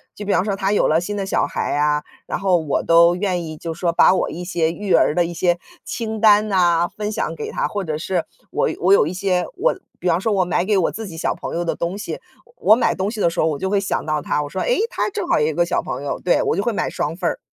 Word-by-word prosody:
就 205 - -7
比 200 - -1
方 185 - +2
说 200 -2 -1
她 195 0 -1
有 210 - +3
了 160 +2 +3
新 205 +3 -4
的 195 - -2
小 195 - +1
孩 - - -2
啊， 150 0 +2 0.2
然 - - -3
后 190 -2 +3
我 155 -4 -1
都 170 +1 +5
愿 180 -2 -1
意 155 -1 -7
就 165 +1 -5
说 170 +1 -1
把 170 - +5
我 - - 0
一 175 +2 -6
些 165 -3 0
育 200 +2 -2
儿 - - +4
的 175 +1 +2
一 170 - -5
些 175 0 +1 0.2
清 220 -2 -4
单 210 -1 +6
哪， 175 -3 +3
分 210 +2 -5
享 165 -7 -2
给 150 - -5
她。 - - -1
或 205 -1 -3
者 155 -3 -3
是 175 +1 -1 0.3
我 - - +1
我 185 +3 +4
有 170 - +5
一 165 - -3
些 185 -1 0
我 - - +1 0.2
比 - - -3
方 170 -1 +3
说 215 +2 0
我 185 -2 +2
买 175 +1 0
给 210 -1 +2
我 180 - +1
自 220 -1 -6
己 165 -3 -9
小 - - -1
朋 - - -6
友 175 - -1
的 170 - -1
东 175 +3 -3
西， 210 - -5 0.3
我 485 - -23 0.2
我 - - +7
买 240 - +1
东 190 +3 -1
西 220 - -6
的 - - +4
时 170 - -5
候 155 - +3
我 155 -3 -1
就 190 - -2
会 200 0 +2
想 195 - -2
到 155 -1 -1
她， 150 - -1
我 145 - -6
说： 190 - -3
“哎， - - +1
她 - - -1
正 380 -3 -3
好 - - +2
有 150 - +2
一 160 - -1
个 170 +3 +2
小 - - 0
朋 - - -5
友。” 145 - -3
对， 175 - +3
我 - - 0
就 200 - 0
会 235 - 0
买 - - -1
双 150 +3 -2
份 180 -1 -2
儿， - - -5
180 Hz, 320 characters per minute, -20 LUFS, 165-200 Hz, 0.3 s, 我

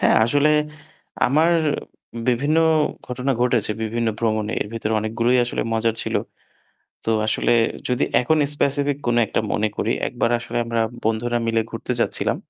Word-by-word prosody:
হ্যাঁ, - - +4
আসলে 145 +6 +3 0.8
আমার 155 +6 +3 0.8
বিভিন্ন 140 +6 +2 0.5
ঘটনা 125 +2 -1
ঘটেছে 120 -4 +2
বিভিন্ন 115 +1 -1
ভ্রমণে। 110 -1 0
এর - - -10
ভেতরে 110 -1 -2
অনেকগুলোই 115 +3 +1
আসলে 120 - -2
মজার 115 0 +1
ছিল। - - -4 0.9
তো - - 0 0.2
আসলে 110 - +1 0.4
যদি 125 +2 +1 0.2
এখন 155 +5 +2 0.2
স্পেসিফিক 140 0 +1
কোনো 120 0 +2
একটা - - -1
মনে 110 +1 +1
করি 115 - 0 0.2
একবার 120 -1 -1
আসলে 115 0 -4
আমরা 115 0 -1 0.2
বন্ধুরা 120 +2 0
মিলে 115 0 +2
ঘুরতে 115 +2 -3
যাচ্ছিলাম - - 0
120 Hz, 145 wpm, -22 LUFS, 115-125 Hz, 0.9 s, হ্যাঁ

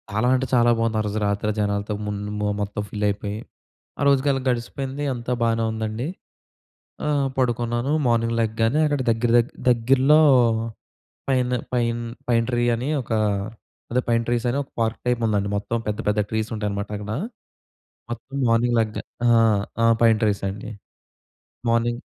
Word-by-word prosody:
చాలా 110 +4 0
అంటే 130 +1 0
చాలా 120 -1 +5
బావుంది. 115 -1 0
ఆ - - +2
రోజు 105 +1 -3
రాత్రి 100 +1 -1
ఆ - - -3
జనాలతో 100 0 -1
ముంద్ 105 0 -4
మొ 105 - 0
మొత్తం 105 +1 -3
ఫిల్ 105 0 -2
అయిపోయి. 105 +1 -3 0.6
ఆ - - 0
రోజుకి 140 0 +3
అలా 135 - -1
గడిసిపోయింది. 130 +3 -2
అంతా 120 0 -4
బానే 115 -1 +2
ఉందండి. 110 +3 -3 1.0
ఆహ్, 145 -2 +1
పడుకున్నాను. 120 +1 0
మార్నింగ్ 115 -1 +2
లెగ్గానే 115 +5 +1
అక్కడ 145 -2 0
దగ్గర 115 +1 +1
దగ్ 120 +1 +1 0.2
దగ్గరలో 130 +5 +4 1.1
పైన 125 -2 +1 0.2
పైన్ 120 -1 0 0.3
పైన్ 115 -1 +2
ట్రీ 120 -1 +1
అని 125 +5 -3
ఒక, 120 - -11 0.8
అదే 125 +2 +2
పైన్ 115 0 +2
ట్రీస్ 120 0 0
అని 125 - -1
ఒక - - -23
పార్క్ 110 0 0
టైప్ 125 -1 +1
ఉందండి. 100 -2 0
మొత్తం 110 +3 -2
పెద్ద, 105 -1 -2
పెద్ద 105 0 +1
ట్రీస్ 110 0 -1
ఉంటాయనమాట 105 -1 -3
అక్కడా. 105 +2 -4 0.9
మొత్తం 120 +4 -7
మార్నింగ్ 120 +1 +2
లెగ్గా 110 -1 -2 0.2
ఆ! - - +5 0.5
ఆ! - - +4 0.2
పైన్ 115 -2 +5
ట్రీస్ 105 -2 +1
అండి. 100 +3 -6 1.0
మార్నింగ్ 120 +1 +1
115 Hz, 155 wpm, -23 LUFS, 105-125 Hz, 1.1 s, చాలా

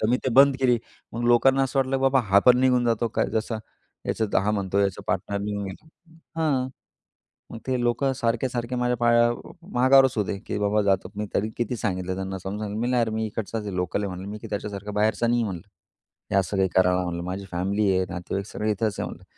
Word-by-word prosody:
तर 110 - +1
मी 125 - +4
ते 130 - -2
बंद 135 0 +7
केली. 125 -3 +3 0.4
मग 120 - -3
लोकांना 135 +3 +5
असं 135 +1 -1
वाटलं, 135 0 +1
की - - -3
बाबा 135 0 +4
हा 100 - +7
पण 125 0 +7
निघून 125 -2 +3
जातो 115 0 +1
काय - - +3
जसा. 110 0 -1 0.5
याचा 110 -2 +1
हा 105 - +1
म्हणतो 100 -2 -1
याचा 100 -2 0
पार्टनर 95 +2 -1
निघून 100 0 -3
गेला 95 +10 -9 0.5
हं. 135 -5 +1 0.8
मग - - -7
ते 130 -1 0
लोकं 125 +3 +1
सारखे, 120 +2 0
सारखे 120 0 -3
माझ्या 125 0 +1
पाया 120 0 +4 0.4
मागावरच 130 +1 +5
होते, 100 -1 -1
की - - -2
बाबा 105 +1 +2
जातो. 95 -2 +1
मी 105 +1 -3
तरी 105 +2 0
किती 120 +1 -1
सांगितलं 95 -3 -2
त्यांना, 95 0 -4
समजून 95 +3 -5
सांगितलं 105 0 -4
मी, 120 - 0
"नाही 125 -1 +2
यार, 115 - +1
मी 110 0 -2
इकडचाच 110 0 -4
आहे, 100 -3 -4
लोकल 90 +3 -1
आहे," 100 - -1
म्हटलं, 95 +1 -7
"मी, 105 - -6
की 115 - -9
त्याच्यासारखा 105 0 -5
बाहेरचा 110 +2 +2
नाही," 120 0 +2
म्हणलं, 100 -2 -5 0.7
"हे 95 - +5
सगळं 95 +3 -4
काही 95 -1 +3
करायला," 90 0 +3
म्हणलं. 85 -1 -4
"माझी 95 +2 -5
फॅमिली 100 +4 0
आहे, 95 0 +1
नातेवाईक 95 +3 -4
सगळे 105 0 -2
इथेच 105 0 -1
आहे," - - -2
म्हटलं. - - -11
105 Hz, 225 wpm, -25 LUFS, 100-120 Hz, 0.8 s, बंद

